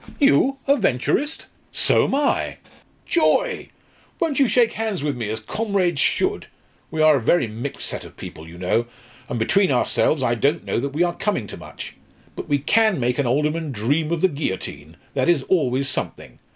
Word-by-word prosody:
"You 275 -1 +4
a 280 +1 +4
Venturist? 220 - 0 0.3
So - - +3
am - - 0
I. 285 0 0 0.5
Joy! 475 +8 +1 0.5
Won't 320 -5 0
you 275 - +5
shake 235 -1 +3
hands 215 -8 -2
with 145 -2 -1
me, 115 -4 -4
as 110 +1 -3
comrades 185 - -1
should? - - 0 0.4
We 155 0 0
are 155 -2 +6
a - - -3
very 130 +5 +3
mixed 115 +5 -5
set - - -4
of - - -14
people, 80 +1 -9
you 85 +1 -11
know, 95 +6 0 0.4
and 120 - -2
between 185 - +2
ourselves 130 +2 +1
I 120 - +2
don't 140 +7 0
know - - -1
that 140 +3 -2
we 170 - +3
are 175 -1 0
coming 195 - -1
to - - -8
much. - - -10 0.4
But - - -7
we 145 - +3
can 215 +6 +2
make 125 +2 0
an 140 - +1
alderman 150 +4 0
dream 140 +8 0
of 170 -2 -1
the 190 - +5
guillotine 95 - -5 0.2
that 135 +3 +1
is 160 -6 +3
always 135 -6 +1
something. 130 - -5
150 Hz, 190 wpm, -22 LUFS, 125-200 Hz, 0.5 s, are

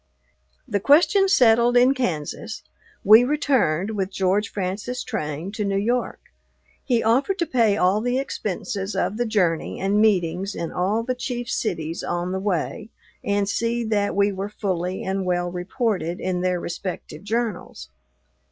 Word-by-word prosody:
The 205 -5 0
question 320 - +4
settled 240 - +4
in 250 +2 +5
Kansas, 180 - -3 0.4
we 215 +4 +8
returned, 245 - +1
with 195 -3 -2
George 195 +2 0
Francis 205 +6 -4
Train, 150 +5 -4
to 215 0 -3
New 200 -1 0
York. 240 +5 -1 0.6
He 240 -4 +1
offered 265 - +2
to 340 - 0
pay 230 -8 +2
all 190 +3 +2
the 245 +2 0
expenses 200 -5 -3
of 210 - -1
the 240 0 0
journey 180 -7 0
and 200 +2 +2
meetings 195 -2 +1
in 170 0 -4
all 200 +6 0
the 255 +2 -1
chief 245 -1 -4
cities 165 -5 -2
on 175 +1 -2
the 190 - -2
way, 200 +3 -2 0.3
and 200 0 0
see 235 +3 -1
that 210 -2 0
we 200 +1 +3
were 195 +1 -4
fully 185 -3 -3
and 190 0 -2
well 175 -1 -1
reported 180 -2 -2
in 180 -1 -2
their 180 -1 0
respective 170 -2 -6
journals. 220 - -3
205 Hz, 150 wpm, -23 LUFS, 180-235 Hz, 0.6 s, we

